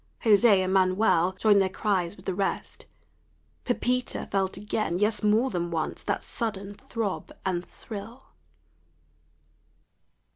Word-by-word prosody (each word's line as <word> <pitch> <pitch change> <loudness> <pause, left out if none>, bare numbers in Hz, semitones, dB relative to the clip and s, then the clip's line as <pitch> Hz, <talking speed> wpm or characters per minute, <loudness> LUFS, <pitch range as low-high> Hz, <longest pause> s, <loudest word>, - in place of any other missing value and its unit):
José 205 -3 +5
and 185 0 -1
Manuel 185 -1 +3
joined 200 +1 +4
their 190 - +1
cries 190 -2 -1
with 185 - -16
the 190 - -1
rest. 195 +2 -3 0.8
Pepita 250 0 -1
felt 190 -1 0
again 210 -3 -1
yes, 210 +2 +1
more 220 +5 +3
than 175 -2 -2
once 160 -2 -3
that - - -2
sudden 205 -4 -3
throb 205 -1 -4
and 180 -2 0
thrill. 220 +6 -9
200 Hz, 120 wpm, -27 LUFS, 185-220 Hz, 0.8 s, José